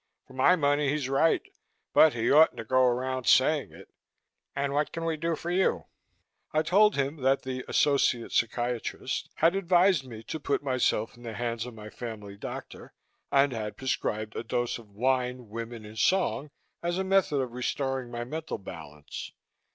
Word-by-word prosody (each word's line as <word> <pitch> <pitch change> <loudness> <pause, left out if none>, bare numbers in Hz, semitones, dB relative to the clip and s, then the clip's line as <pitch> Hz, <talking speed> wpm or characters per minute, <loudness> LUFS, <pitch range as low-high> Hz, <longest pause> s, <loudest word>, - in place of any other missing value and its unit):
For - - -16
my 130 +8 +5
money, 145 -3 +2
he's 145 -2 -1
right 140 +4 +3 0.5
but 155 - +7
he 115 0 +1
oughtn't 155 +3 +6
to - - -4
go 130 +3 +3
around 130 0 -1
saying 145 +2 +4
it. - - -13 0.7
And 140 0 -1
what 150 +1 0
can 165 0 -4
we 165 -1 0
do 165 +1 -1
for 170 +2 -5
you?" 185 +1 +1 0.7
I 155 0 +2
told 205 +6 +4
him 140 +2 -1
that 135 0 +1
the 130 -1 -4
"associate 135 -4 +2
psychiatrist" 120 +1 -1
had 165 +3 +3
advised 185 -4 +3
me 115 -3 -9
to 160 - -5
put 145 0 -1
myself 130 -5 0
in 120 - -17
the 115 -2 -6
hands 115 0 -3
of 120 - -9
my 105 -1 -10
family 105 -4 -7
doctor 100 - -8 0.4
and 140 -1 +4
had 105 -2 -5
prescribed 110 -4 -2
a - - -3
dose 120 +1 -2
of 110 -3 -15
wine, 125 +2 -1
women 115 0 -6
and 110 +1 -9
song 185 -5 +1 0.3
as 175 +1 -1
a 190 - 0
method 190 -6 +2
of 130 -2 -2
restoring 130 +1 -2
my 120 0 -4
mental 155 +6 -5
balance. 80 -7 -9
130 Hz, 175 wpm, -28 LUFS, 115-155 Hz, 0.7 s, but